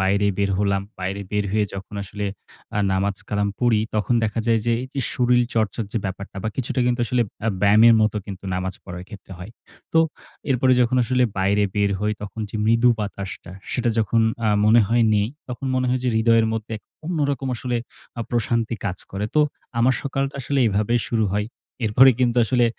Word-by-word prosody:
বাইরে 100 +2 +2
বের 100 -1 +1
হলাম। 100 -1 +1 0.2
বাইরে 95 +2 -3
বের 105 0 0
হয়ে 105 0 +2
যখন 100 +1 -8
আসলে 100 +1 -5 0.5
আ - - +1
নামাজ-কালাম 100 +1 -1
পড়ি, 120 -3 +3
তখন 110 +3 +1
দেখা 110 +1 -1
যায় 115 -1 +3
যে 120 - +3
এইযে 130 +1 -5
শরীল 125 -1 +3
চর্চার 110 0 0
যে 115 - 0
ব্যাপারটা 100 +1 -6
বা 110 - -1
কিছুটা 130 0 -1
কিন্তু 120 0 +1
আসলে 125 +1 +2 0.2
অ্যা 115 - +1
ব্যায়ামের 110 +3 +7
মত 110 -1 +3
কিন্তু 95 -1 -8
নামাজ 95 +1 -2
পড়ার 90 -1 -7
ক্ষেত্রে 100 -3 -11
হয়। 90 +4 -8 0.4
তো 165 - +4 0.5
এরপরে 130 0 +3
যখন 125 +1 +2
আসলে 125 +1 +1 0.2
বাইরে 100 +2 +2
বের 100 -1 +2
হই, 105 0 +1
তখন 105 +2 -7
যে - - -4
মৃদু 115 +2 +4
বাতাসটা, 100 -2 -6 0.2
সেটা 120 -2 +1
যখন 110 +1 +2 0.3
আ - - +3 0.2
মনে 110 +2 +6
হয় 115 +1 +3
নেই, 105 0 +2 0.2
তখন 125 +2 -5
মনে 130 0 +1
হয় 125 +1 +1
যে - - +2
হৃদয়ের 115 0 +4
মধ্যে 110 0 -4
এক 105 - -14 0.2
অন্যরকম 145 -6 -1
আসলে 125 0 -2 0.4
আ - - -1
প্রশান্তি 115 -1 0
কাজ 90 -2 -2
করে। 100 +2 -3
তো 155 - +5 0.4
আমার 125 +3 +4
সকালটা 135 0 -2
আসলে 140 +2 -1
এভাবেই 110 +3 +1
শুরু 110 -2 +2
হয়। 105 0 0 0.4
এরপরে 125 +5 +7
কিন্তু 125 -1 +2
আসলে 120 +1 +2
110 Hz, 190 wpm, -22 LUFS, 100-125 Hz, 0.5 s, ব্যায়ামের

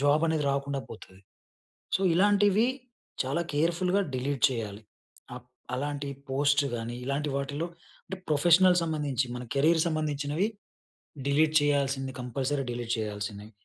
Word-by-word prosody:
Job 145 +3 +3
అనేది 160 -2 0
రాకుండా 140 0 -1
పోతది. 95 -3 -12 0.7
సో, - - +2
ఇలాంటివి 205 +3 +4 0.6
చాలా 140 +6 -1
కేర్‌ఫుల్‌గా 175 +6 +1
డిలీట్ 130 0 -2
చేయాలి. 110 -4 -5 0.5
అప్ 125 0 -11 0.3
అలాంటి 145 +1 -3 0.2
పోస్ట్ 145 +1 +3
గాని 115 +1 -4
ఇలాంటి 140 +3 -1
వాటిల్లో 145 +4 -2 0.4
అంటే, 190 - -5
ప్రొఫెషనల్ 175 +4 +5
సంబంధించి, 145 -5 -1
మన 125 - -6
కెరియర్ 160 +4 +4
సంబంధించినవి 155 +3 0 0.8
డిలీట్ 155 +2 +3
చేయాల్సింది, 140 -2 +1
కంపల్సరీ 135 +3 -2
డిలీట్ 120 -1 -2
చేయాల్సినయి. 105 0 -5
145 Hz, 120 wpm, -28 LUFS, 130-160 Hz, 0.8 s, ప్రొఫెషనల్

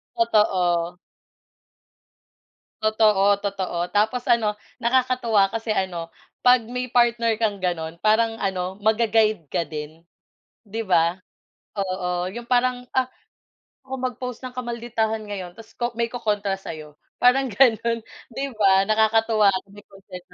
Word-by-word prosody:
Totoo. 180 -7 +2 1.9
Totoo, 215 -2 +3 0.2
totoo, 195 -3 -3 0.2
tapos 220 +4 +2
ano 215 -3 +2 0.3
nakakatuwa 240 -4 +2
kasi 225 0 -3
ano 175 -4 -2 0.3
'pag 250 0 +6
may 250 0 -4
partner 235 -2 +3
kang 205 -3 0
gano'n 165 -2 -2
parang 225 +1 +3
ano 190 -1 -2
ma-ga-guide 215 -4 +2
ka 170 - 0
din, 155 +1 -8 0.6
di 220 +1 -5
ba? 170 -1 +2 0.6
Oo 180 -2 -2
'yong 235 +2 -8
parang, 250 0 +1
ah, 255 -1 +2 0.8
ako 265 - -5
mag-post 250 -1 -4
ng 250 -1 -7
kamalditahan 235 -2 -2
ngayon 190 -4 -6
tapos 225 -1 -14
ko 240 - -2
may 235 0 +1
ko-kontra 205 -5 -1
sayo. 155 -5 -9 0.2
Parang 265 +2 +4
gano'n 230 0 +3 0.3
'di 270 - -4 0.2
ba 195 -2 +5
nakakatuwa 220 -1 +3 0.2
may 205 0 -14
concern 195 -2 -12
215 Hz, 120 wpm, -23 LUFS, 190-235 Hz, 1.9 s, pag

